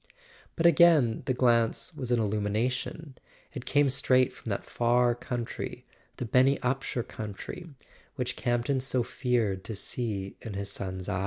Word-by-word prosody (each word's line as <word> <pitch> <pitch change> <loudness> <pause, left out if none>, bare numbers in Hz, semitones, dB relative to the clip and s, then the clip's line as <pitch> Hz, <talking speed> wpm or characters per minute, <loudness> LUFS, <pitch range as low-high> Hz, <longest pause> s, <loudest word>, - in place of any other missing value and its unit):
But 165 - -1
again 165 -9 +5
the 130 - +2
glance 115 -2 +2
was 125 - -5
an 120 -1 +3
illumination; 115 +7 -2 0.3
it - - -7
came 145 0 +4
straight 130 -1 +3
from - - -9
that - - -2
far 120 0 +2
country, 120 0 -5 0.3
the 125 - -3
Benny 130 +4 +4
Upsher 125 -1 -1
coun¬ 105 -3 -7
try, 180 - -7 0.5
which 125 -2 -2
Campton 120 +2 0
so 130 -1 0
feared 115 -6 -1
to 110 - -5
see 100 -2 -3
in 110 -4 -7
his 100 0 -2
son's 95 -2 -4
eyes. 100 -2 -1
120 Hz, 155 wpm, -28 LUFS, 110-130 Hz, 0.5 s, again